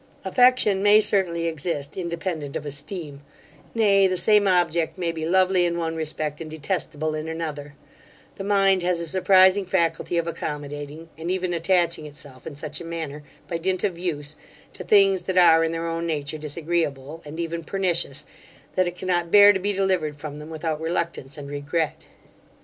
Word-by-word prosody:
Affection 220 -2 +4
may 205 +1 +6
certainly 190 -5 +2
exist 160 -3 -3
independent 170 -4 -4
of 150 - -4
esteem; 145 0 -7 0.5
nay, 200 -3 +4
the 185 -1 -1
same 210 +1 +4
object 170 -3 +1
may 175 -2 -1
be 160 -1 -4
lovely 185 0 +3
in 170 -1 0
one 165 -1 -2
respect, 155 -1 -3
and 160 - -6
detestable 155 -1 -3
in 155 +1 -4
another 150 -3 -5 0.6
The 195 - -5
mind 195 -2 +3
has 175 -1 0
a 170 - -3
surprising 190 +2 +4
faculty 170 -2 0
of 170 - +1
accommodating, 150 0 -6
and 165 +2 -4
even 185 -1 -1
attaching 170 -2 +1
itself, 140 -3 -10
in 145 - -7
such 150 +2 -5
a - - -6
manner, 160 -3 -6 0.3
by 170 -2 -3
dint 185 +1 -1
of 195 -4 0
use, 155 -4 -4 0.4
to 185 - -8
things 195 -1 +4
that 185 -1 -2
are 165 -2 +6
in 165 - 0
their 165 0 -3
own 165 0 -3
nature 155 -1 -3
disagreeable, 155 -1 -3
and 150 +2 -9
even 170 0 -3
pernicious, 170 -6 0 0.5
that 185 -1 +2
it 175 - -4
cannot 175 -2 -1
bear 205 +2 +8
to 190 - -1
be 200 +2 -1
delivered 185 -6 0
from 150 0 -7
them 150 +1 -9
without 160 -1 -3
reluctance 165 -4 -3
and 145 -1 -8
regret. 145 +3 -3
170 Hz, 175 wpm, -24 LUFS, 155-185 Hz, 0.6 s, bear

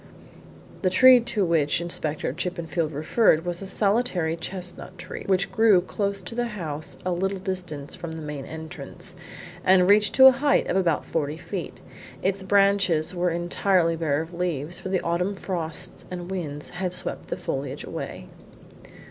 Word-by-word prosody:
The 185 - +2
tree 255 +7 +8
to 215 -4 -1
which 160 -4 +2
Inspector 155 -5 -2
Chippenfield 170 -1 -2
referred 160 +3 +2
was 175 +1 -1
a 195 - -6
solitary 195 -5 +1
chestnut 180 +1 -6
tree, 180 +2 -8
which 190 -1 +1
grew 220 -5 +5
close 200 +1 -3
to 180 - -7
the 240 +1 -1
house 155 -2 -3
a 185 - 0
little 190 +3 -1
distance 180 -7 -4
from 170 -2 -6
the 160 - -6
main 150 -2 -5
entrance, 160 +3 -9 0.5
and 185 -1 +5
reached 205 0 +5
to 265 - +8
a 265 - +11
height 275 +3 +2
of - - -1
about 175 -5 +1
forty 150 -1 -2
feet. 180 +1 -6 0.4
Its 195 +1 0
branches 195 -4 +3
were 180 0 +1
entirely 175 0 +1
bare 160 -2 0
of 165 +2 -13
leaves, 170 -2 -2
for - - -6
the 185 -1 0
autumn 180 +4 -1
frosts 180 -2 -4
and 180 0 -6
winds 150 -6 -4
had 180 0 -3
swept - - -3
the - - -4
foliage - - -4
away. - - -6
180 Hz, 165 wpm, -25 LUFS, 160-195 Hz, 0.5 s, a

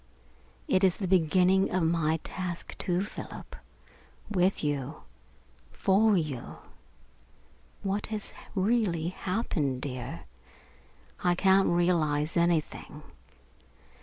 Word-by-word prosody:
It 185 - +2
is 185 -2 +4
the 195 - -2
beginning 185 +2 +4
of 185 -2 0
my 160 -1 +2
task, 180 -2 -5
too, 180 +1 0
Philip, 205 - -8 0.8
with 185 -2 +2
you 145 0 -2 0.7
for 200 - +3
you. 150 -7 -4 1.3
What 200 +1 -1
has 215 -2 -4 0.2
really 190 -5 +1
happened, 180 - -2
dear? 125 - -5 1.0
I 175 -1 +3
can't 190 +1 +4
realise 165 -3 +1
anything. 170 -2 0
175 Hz, 95 wpm, -29 LUFS, 155-190 Hz, 1.3 s, is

